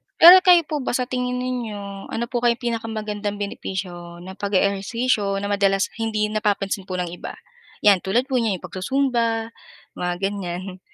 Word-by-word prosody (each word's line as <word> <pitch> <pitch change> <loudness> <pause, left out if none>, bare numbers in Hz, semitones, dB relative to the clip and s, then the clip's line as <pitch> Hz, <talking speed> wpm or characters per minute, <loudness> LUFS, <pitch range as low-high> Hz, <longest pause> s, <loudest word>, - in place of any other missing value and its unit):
Pero 355 +3 +10
kayo 360 -3 +6
po 300 0 -3
ba 255 -2 -2
sa 255 - +1
tingin 250 0 -2
ninyo, 210 -6 -5
ano 235 - -3
po 240 - 0
kayang 240 0 +1
pinakamagandang 215 -3 -3
benepisyo 175 -3 -6
na 190 - -8
pag-eehersisyo 200 +2 0
na 200 - -2
madalas 195 -1 +2
hindi 220 -1 -1
napapansin 205 -2 -1
po 185 - -4
ng 180 -2 -3
iba? 175 - -7 0.5
'Yan, 200 -3 +6
tulad 225 +8 +1
po 255 - +3
niyan, 220 -5 +1
'yong 180 - -11
pagsu-Zumba, 230 +3 -1 0.5
mga 180 0 -1
ganiyan. 185 -1 -4
205 Hz, 160 wpm, -22 LUFS, 195-240 Hz, 0.5 s, Pero